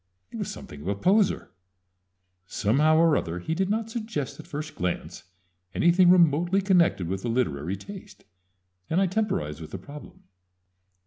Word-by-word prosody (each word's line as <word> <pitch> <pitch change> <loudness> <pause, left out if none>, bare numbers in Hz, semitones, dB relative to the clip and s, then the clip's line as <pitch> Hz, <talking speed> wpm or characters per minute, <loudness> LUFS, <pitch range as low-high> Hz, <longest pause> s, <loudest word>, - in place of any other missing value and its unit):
It - - -7
was - - -3
something 75 - -9
of 80 - -8
a 100 - 0
poser. 195 - +2 1.0
Somehow 145 +12 +2
or 165 -2 +4
other 85 -1 -2
he 90 - -3
did 190 +3 -1
not 225 +1 -1
suggest 180 - -4
at - - -11
first 150 +1 -6
glance 90 0 -4 0.5
anything 175 +1 +5
remotely 175 +1 +4
connected 180 - +2
with 95 +2 -3
a - - -2
literary 95 - -1
taste, 195 - -11 0.7
and 165 - +2
I 195 - +4
temporized 170 - -2
with 80 - -8
the - - -6
problem. 145 +10 -12
155 Hz, 155 wpm, -26 LUFS, -, 1.0 s, anything